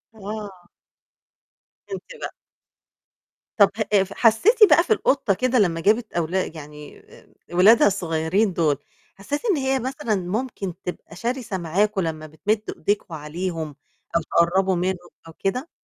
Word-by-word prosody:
آه. 205 -3 -7 1.3
انتِ 390 - -5 0.2
بقى. - - -4 1.3
طَب 200 -2 +7 0.2
ه 195 -2 +5
ف 195 +1 -9
حسّيتِ 245 - +4
بقى 340 +3 +6
في 440 - +3
القطة 265 - +1
كده 255 +5 +1
لمّا 170 -5 +2
جابت 220 +4 +1
أولا 175 +3 0
يعني 150 -2 -11
آآ، - - -19 0.3
أولادها 205 +5 +6
الصغيّرين 175 +3 0
دُول، 155 -5 +1 0.4
حسّيتِ 285 +10 -4
إن 405 -8 +2
هي 265 -1 0
مثلًا 255 -3 -2
ممكن 195 +1 -3
تبقى 175 -2 -7
شرسة 235 -1 -3
معاكم 195 +4 0
لمّا 155 -2 -4
بتمد 205 +8 -1 0.2
إيديكم 200 -1 -1
عليهم 160 0 -4 0.4
أو 170 - +3
تقرّبوا 185 +4 +2
منهم 180 0 -2 0.2
أو 165 - -11
كده؟ 250 - -2
195 Hz, 135 wpm, -23 LUFS, 170-225 Hz, 1.3 s, طَب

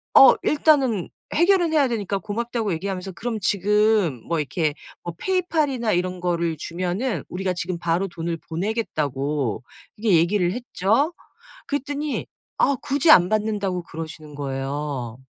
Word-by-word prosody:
어 270 - +10
일단은 275 - +2 0.3
해결은 345 -1 +4
해야 290 -4 +4
되니까 205 -4 -2
고맙다고 220 0 -2
얘기하면서 190 +2 -4
그럼 225 +5 -4
지금 205 - +2
뭐 170 -1 0
이렇게 155 +1 -1 0.3
뭐 175 - -5
페이팔이나 310 - 0
이런 180 +1 -1
거를 170 -2 -1
주면은 180 - -2
우리가 185 0 -2
지금 175 0 -3
바로 170 +3 0
돈을 170 -1 -4
보내겠다고 150 - -2 0.3
그렇게 210 -4 +2
얘기를 175 +2 +2
했죠. 240 - 0 0.5
그랬더니 290 +1 -3 0.3
아 280 - +4
굳이 285 +3 +1
안 180 - +8
받는다고 205 -4 0
그러시는 155 -2 -8
거예요. 135 -3 -4
190 Hz, 325 characters per minute, -23 LUFS, 165-235 Hz, 0.5 s, 어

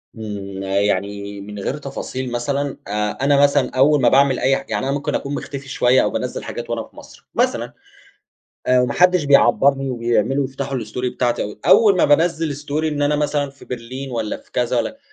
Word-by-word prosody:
إمم، 100 -3 -6
يعني 100 +1 -1
من 105 0 -8
غير 120 - -3
تفاصيل 130 -2 -5
مثلًا، 140 +3 -2
آآ، 105 0 -2
أنا 140 0 +4
مثلًا 140 -2 +3
أول 140 +2 +4
ما 120 - +5
باعمل 135 -1 +4
أي 135 - +3
ح - - -9
يعني - - -1
أنا 135 - 0
ممكن 145 - -2
أكون 140 +1 -3
مختفي 140 -1 -7
شوية 125 0 +3
أو - - +1
بانزل - - -4
حاجات - - -6
وأنا - - -2
في - - -19
مصر، - - -15
مثلًا، - - 0 0.9
آآ، 125 0 +4
وما 125 -1 0
حدش 180 -3 +4
بيعبرني 140 -1 +4
وبيعملوا 120 +3 0
بيفتحوا 135 0 -4
الStory 125 +3 -4
بتاعتي، 120 -4 -1
أول 205 -4 +6
ما - - +4
بانّزل 160 0 +2
Story 145 +2 -3
إن 150 -2 -1
أنا 145 +1 +2
مثلًا 145 -1 -1
في 140 - -17
برلين 125 +2 -6
والّا 115 -3 -3
في - - -22
كذا 125 0 0
والّا 275 - -2
135 Hz, 190 wpm, -20 LUFS, 115-145 Hz, 0.9 s, أول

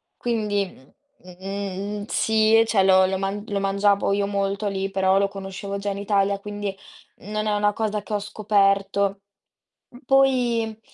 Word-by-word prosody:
quindi, 210 -4 -1 0.6
mhmm, 195 +2 -5
sì, 220 +1 +3
cioè, 210 -4 +2
lo 190 0 +5
lo 190 0 -1
man 195 +2 -3
lo 200 -1 -2
mangiavo 200 +1 +2
io 200 0 0
molto 200 +1 -1
lì, 195 -1 -2
però 190 0 +2
lo 200 0 +3
conoscevo 195 0 -6
già 200 +1 -3
in 200 - -3
Italia, 200 -1 +1
quindi 205 -1 -5 0.4
non 215 +1 -4
è 210 - +1
una 205 0 +2
cosa 215 -1 -2
che 210 - -7
ho 205 - +1
scoperto. 200 -1 +1 0.7
Uhm, 245 - -15
poi, 245 -5 +2
200 Hz, 155 wpm, -23 LUFS, 195-210 Hz, 0.7 s, lo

